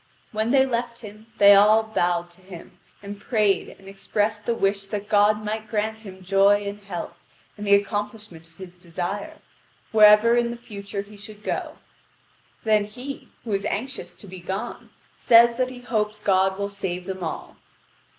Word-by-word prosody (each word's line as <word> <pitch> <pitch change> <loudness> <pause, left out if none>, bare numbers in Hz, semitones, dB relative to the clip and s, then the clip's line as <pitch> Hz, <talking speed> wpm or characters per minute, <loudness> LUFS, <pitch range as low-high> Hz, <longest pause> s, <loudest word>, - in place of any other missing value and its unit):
When 220 +1 -1
they 265 +1 +4
left 235 -2 -3
him, 215 0 -12
they 200 0 +8
all 210 +2 +6
bowed 175 -5 -1
to 175 +2 -20
him, 180 -2 -13 0.2
and 200 0 -8
prayed 210 -3 +1
and 195 - -16
expressed 205 +2 -2
the 235 - +1
wish 195 -1 -1
that 205 0 -5
God 210 0 +3
might 215 +1 -4
grant 220 0 -2
him 190 -3 -12
joy 200 +2 +3
and 200 +1 -5
health, 195 -3 -7 0.4
and 210 -1 -7
the 200 - +7
accomplishment 205 -4 -4
of 165 - -28
his 185 -2 -11
desire, 180 +3 -5 0.5
wherever 215 +1 +6
in 240 0 +1
the 235 - -6
future 200 -3 -7
he 205 +1 -15
should 210 +1 -13
go. - - -4 0.9
Then 215 -2 +3
he, 250 +6 -9
who 230 - -6
is 195 0 0
anxious 260 +7 -4
to - - -14
be 185 -1 -10
gone, 190 +6 -6 0.3
says 235 0 +6
that 255 -1 0
he 250 -1 -10
hopes 215 -3 -2
God 190 -2 +2
will 200 0 -3
save 185 -3 -4
them 190 -1 -5
all. 165 - -6
205 Hz, 175 wpm, -24 LUFS, 195-220 Hz, 0.9 s, they